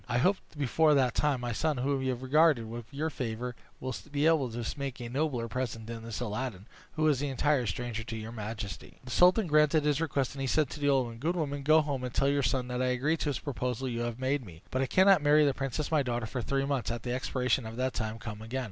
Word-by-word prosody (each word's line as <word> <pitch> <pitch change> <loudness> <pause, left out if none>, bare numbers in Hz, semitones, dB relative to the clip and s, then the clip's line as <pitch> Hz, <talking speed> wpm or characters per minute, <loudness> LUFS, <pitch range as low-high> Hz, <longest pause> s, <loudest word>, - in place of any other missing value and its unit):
I 120 - +1
hope 185 +10 +3 0.2
before 150 +2 +3
that 130 -3 +3
time 145 -4 +1
my 120 -1 -2
son, 150 +5 0
whom 135 +2 0
you 130 - -1
have 125 0 -3
regarded 145 -3 +4
with 115 +1 -8
your 155 +3 -2
favor, 125 -1 -4 0.2
will 130 0 -4 0.2
be 145 +1 +1
able 160 -6 +3
to 115 0 -5
make 135 -2 -4
a 120 -1 -5
nobler 130 -3 -1
present 115 -2 -3
than 115 0 -6
this 115 -1 -5
Aladdin, 110 -3 -4 0.3
who 155 0 +1
is 140 -3 +2
an 145 - 0
entire 135 -1 +1
stranger 115 +2 -3
to 115 -1 -5
your 110 +1 -6
majesty." 105 -3 -6
The 130 - -9
sultan 180 - +5
granted 150 -1 +4
his 150 0 +1
request, 140 -5 0
and 135 - -6
he 135 - -1
said 150 +1 +2
to 150 - -7
the 145 -1 +2
old 135 -2 +3
woman, 115 -1 -8
"Good 165 +7 0
woman, 145 -4 -2
go 155 +3 +5
home, 140 -4 -3
and 125 - -3
tell 135 +3 +2
your 140 0 +2
son 125 0 0
that 125 0 -2
I 130 - +2
agree 130 +6 +1
to 150 - -1
the 135 - -3
proposal 125 -2 -3
you 120 -2 -3
have 120 -1 -3
made 130 +1 0
me; 85 -6 -13
but 130 - 0
I 135 - +1
cannot 190 +2 +5
marry 150 +1 +5
the 140 - +3
princess 135 +3 -3
my 155 -2 +4
daughter 120 -3 -2
for 125 +3 -4
three 135 +3 0
months. 140 -3 -1
At 120 -1 -3
the 120 - -2
expiration 125 -1 0
of 110 - -7
that 130 +1 -1
time 110 0 -3
come 105 -1 -7
again." 115 +4 -4
130 Hz, 265 wpm, -30 LUFS, 120-145 Hz, 0.3 s, sultan